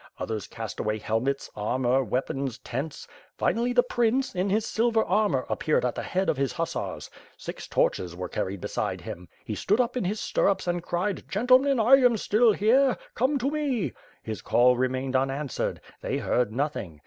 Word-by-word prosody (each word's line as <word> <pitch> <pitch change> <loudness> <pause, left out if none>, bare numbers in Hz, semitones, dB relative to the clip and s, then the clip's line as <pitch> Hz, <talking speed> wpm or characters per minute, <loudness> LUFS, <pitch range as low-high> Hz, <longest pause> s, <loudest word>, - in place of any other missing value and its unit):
Others 110 -2 -4
cast 110 -2 -7
away 105 0 -1
helmets, 115 +6 -1
armor, 125 +5 +1
weapons, 130 +2 -2
tents. 135 +4 -5 0.3
Finally, 240 +2 +1
the 245 0 +4
prince, 250 +2 +1
in 185 +2 0
his 215 +3 +1
silver 225 -1 +2
armor 185 -12 +1
appeared 155 - +1
at 125 - 0
the - - -4
head 190 +1 -1
of - - +1
his 135 -1 0
hussars. 165 -1 -3 0.3
Six - - -7
torches 90 -2 0
were 90 +1 -4
carried 95 -1 -3
beside - - -3
him. 90 +1 -8 0.2
He 110 - -3
stood 205 - +1
up 245 0 +1
in 250 - -1
his 205 +4 -1
stirrups 195 -1 +1
and 175 -1 -1
cried, 180 +3 -2
'Gentlemen, 255 +5 +4
I 245 +5 +7
am 245 -4 +4
still 220 +3 +4
here; 245 +6 +3 0.2
come 265 +5 +1
to 270 +2 -1
me!' 285 - -1 0.3
His 110 -1 -5
call 125 +1 +4
remained 130 +1 -1
unanswered; 135 +1 -1 0.2
they - - -2
heard 120 -3 0
nothing. 120 - -3
170 Hz, 175 wpm, -27 LUFS, -, 0.3 s, I